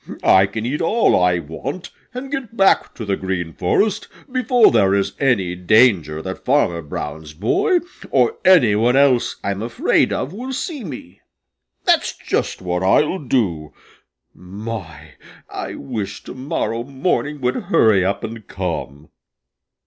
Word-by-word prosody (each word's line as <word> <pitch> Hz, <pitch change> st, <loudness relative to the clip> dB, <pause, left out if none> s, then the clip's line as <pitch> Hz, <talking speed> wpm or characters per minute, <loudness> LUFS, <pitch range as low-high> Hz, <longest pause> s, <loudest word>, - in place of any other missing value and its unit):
I 95 Hz, +1 st, +5 dB
can 110 Hz, +3 st, -5 dB
eat 135 Hz, +5 st, -2 dB
all 215 Hz, +8 st, +3 dB
I 90 Hz, -1 st, +3 dB
want 85 Hz, -, -6 dB, 0.2 s
and 260 Hz, +2 st, -7 dB
get 255 Hz, -5 st, -5 dB
back 195 Hz, 0 st, +3 dB
to 115 Hz, -, -6 dB
the 100 Hz, -1 st, 0 dB
Green 90 Hz, -4 st, -4 dB
Forest 200 Hz, -, 0 dB, 0.2 s
before 250 Hz, -2 st, +4 dB
there 100 Hz, -4 st, +3 dB
is 100 Hz, -1 st, 0 dB
any 110 Hz, -11 st, +1 dB
danger 90 Hz, -5 st, +3 dB
that 95 Hz, 0 st, -6 dB
Farmer 125 Hz, -12 st, +1 dB
Brown's 75 Hz, 0 st, -7 dB
boy 355 Hz, -, +1 dB, 0.3 s
or 440 Hz, -, +2 dB
any 165 Hz, -, +6 dB
one 115 Hz, +4 st, +2 dB
else 135 Hz, -3 st, +3 dB
I'm 100 Hz, 0 st, -2 dB
afraid 115 Hz, +1 st, +1 dB
of 145 Hz, -, -3 dB
will 255 Hz, +6 st, -6 dB
see 285 Hz, 0 st, -4 dB
me. 125 Hz, -, -9 dB, 0.6 s
That's -, -, +2 dB
just -, -, -2 dB
what 90 Hz, 0 st, -2 dB
I'll 150 Hz, -, +2 dB
do. 100 Hz, -, -1 dB, 0.6 s
My, 90 Hz, -5 st, -8 dB, 0.4 s
I -, -, -5 dB
wish 105 Hz, -6 st, -5 dB
to -, -, -9 dB
morrow 130 Hz, -3 st, -3 dB
morning 145 Hz, +2 st, -2 dB
would 125 Hz, 0 st, -1 dB
hurry 105 Hz, -4 st, +4 dB
up 100 Hz, +2 st, -1 dB
and 110 Hz, -1 st, -7 dB
come." 80 Hz, -6 st, -5 dB
110 Hz, 145 wpm, -20 LUFS, 90-145 Hz, 0.6 s, any